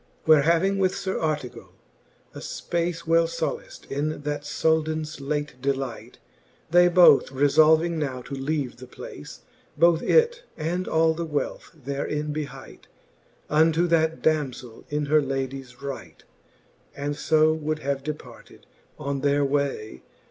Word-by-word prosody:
Where 155 -2 +6
having 170 +6 +2
with 185 -1 +2
Sir 190 -1 -3
Artegall 150 -5 -4 0.6
a - - -8
fpace 170 0 -3
Well 165 0 +3
folaft 165 -1 -5
in 145 +2 -2
that 145 0 -3
Souldans 155 0 0
late 145 -2 -3
delight, 135 -3 -3 0.5
They 175 +1 +6
both 175 -6 +6
refolving 155 +4 +4
now 130 -4 -3
to - - -9
leave 135 -2 -2
the 130 +1 -11
place, - - -10 0.4
Both 165 +1 +4
it 475 +1 +3 0.2
and 175 +4 -2
all 160 0 +3
the 170 +1 -4
wealth 150 -3 -3
therein 150 +1 -3
behight 150 -1 -7 0.6
Unto 160 +2 +3
that 160 -1 +1
damzeli 135 -7 -1
in 150 0 -1
her 150 +1 +4
ladies 135 -1 -5
right, 130 - -7 0.7
And 145 +1 -3
fo 155 +1 +3
would 155 0 -2
have 140 -2 -2
departed 150 +2 -9 0.3
on 140 -2 -3
their 145 0 +2
way. 135 - -2
150 Hz, 135 wpm, -25 LUFS, 140-160 Hz, 0.7 s, Where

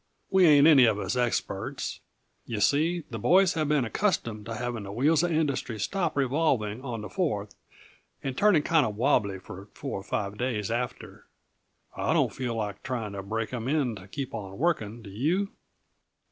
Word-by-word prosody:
We 190 -2 +6
ain't 145 -2 +7
any 145 -6 +8
of 110 -3 +2
us 105 - -2
experts. 120 -1 -2 0.5
Yuh 110 -3 -3
see, 160 +8 +2
the 115 - -4
boys 185 - +4
have 155 -2 -1
been 150 -4 +2
accustomed 115 - -1
to 115 - -4
having 120 -1 -3
the 100 -1 -7
wheels 145 +9 +3
of 175 0 0
industry 140 -8 -1
stop 170 - -1
revolving 130 -5 +1
on 120 -5 -4
the 105 - -6
Fourth, 105 - -2 0.7
and 135 -2 -3
turning 190 -3 +4
kinda 160 -8 +3
wobbly 105 -3 +1
for 95 +1 -10
four - - -4
or - - -10
five 100 +1 -3
days 115 -5 -1
after. 120 +1 -4 0.7
I - - 0
don't - - +2
feel 125 -3 -3
like 105 -3 -4
trying 115 -5 -3
to 100 - -4
break 110 +4 -3
'em 120 -1 -3
in 135 -5 +1
to 95 0 -12
keep 130 +6 -5
on 100 -2 -6
working 120 -8 -1
do 100 - -10
you?" 170 - 0
125 Hz, 180 wpm, -27 LUFS, 105-155 Hz, 0.7 s, any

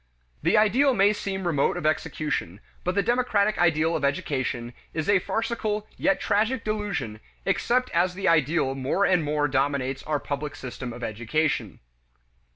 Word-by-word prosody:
The - - +3
ideal 245 +6 +4
may 200 0 +4
seem 195 -2 -4
remote 150 -5 +1
of - - -5
execution, 155 - -1 0.2
but 180 +1 -1
the 200 - +2
democratic 215 -2 +1
ideal 165 -1 +3
of - - -2
education 130 -4 -1 0.2
is 160 -1 -2
a 200 -2 +5
farcical 215 0 -2
yet 290 -1 +1
tragic 220 +4 +1
delusion 205 - -3 0.3
except 250 +1 +1
as 180 +1 +1
the 195 - -2
ideal 155 -3 +3
more 135 +9 0
and 180 -4 +3
more 150 0 +1
dominates 135 -1 0
our 150 -1 -1
public 145 +1 -4
system 125 -1 -6
of 120 +1 -8
education. 120 +9 -1
165 Hz, 155 wpm, -26 LUFS, 140-205 Hz, 0.3 s, a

